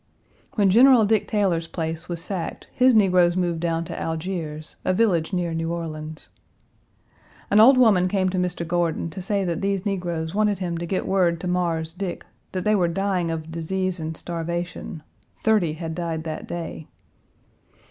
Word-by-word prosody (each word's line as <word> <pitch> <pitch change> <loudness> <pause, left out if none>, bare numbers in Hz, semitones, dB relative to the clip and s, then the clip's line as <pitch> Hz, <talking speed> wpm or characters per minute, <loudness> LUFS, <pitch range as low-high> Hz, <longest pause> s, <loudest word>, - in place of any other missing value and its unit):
When 200 -3 +4
General 245 +1 +7
Dick 215 0 +2
Taylor's 185 -6 +1
place 160 0 -4
was 170 -1 -3
sacked 185 -5 -4
his 255 -1 +4
negroes 180 -4 +4
moved 175 -2 0
down 165 0 -1
to - - -6
Algiers, 160 -2 -4
a 185 - +1
village 185 -7 +2
near 175 -3 -1
New 165 0 -2
Orleans. 155 -2 -6 1.2
An 205 - +6
old 255 +5 +8
woman 205 -8 +5
came 185 0 +1
to 185 0 -1
Mr. 180 -2 -2
Gordon 170 -1 0
to 190 - -7
say 200 +2 0
that 175 -1 -2
these 195 0 -1
negroes 175 -5 -2
wanted 210 -1 +2
him 175 -2 -3
to 170 - -4
get 185 - -1
word 175 -3 +2
to 180 - -3
"Mars 170 -3 -1
Dick" 185 0 -5 0.3
that 185 -1 -3
they 215 - +3
were 185 -4 +3
dying 185 -1 0
of 160 0 -4
disease 185 +3 -2
and 160 0 -4
starvation; 170 -1 -4 0.4
thirty 210 -8 +3
had 160 0 -5
died 165 -2 -3
that 155 -1 -5
day. 165 -2 -6
175 Hz, 170 wpm, -24 LUFS, 165-195 Hz, 1.2 s, old